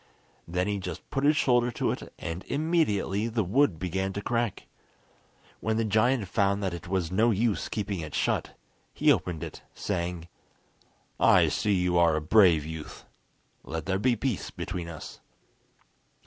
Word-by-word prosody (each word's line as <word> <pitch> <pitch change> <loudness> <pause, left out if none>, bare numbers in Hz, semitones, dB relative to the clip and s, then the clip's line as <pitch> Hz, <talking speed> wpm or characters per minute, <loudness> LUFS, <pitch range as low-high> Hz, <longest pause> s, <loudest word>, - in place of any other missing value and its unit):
Then 90 +2 0
he 100 -1 -1
just 90 -1 -7
put 135 - -1
his 150 +1 +4
shoulder 120 -4 +3
to - - 0
it, - - -6
and 85 +2 -5
immediately 140 - 0
the 115 -1 0
wood 100 - +2
began 95 +3 -2
to 100 - -4
crack. 120 -2 -1 0.9
When 110 0 -1
the 115 - +1
giant 110 +1 +2
found 100 +1 +1
that 95 -2 -1
it 85 +1 -7
was 90 -2 -1
no 110 +5 +3
use 110 0 0
keeping 100 -3 -3
it 80 -2 -6
shut, - - -1 0.4
he - - +4
opened 85 -4 -1
it, - - -8
saying: 85 -1 -3 0.9
"I 85 -3 +5
see 75 +8 0
you 90 -2 +2
are 85 -2 +4
a - - +1
brave 85 -3 +5
youth. 80 -1 -8 0.6
Let 80 +3 -5
there 95 +2 0
be 120 +3 +2
peace 115 -2 -2
between 85 -2 -5
us." 80 -2 -9
95 Hz, 160 wpm, -28 LUFS, 85-115 Hz, 0.9 s, I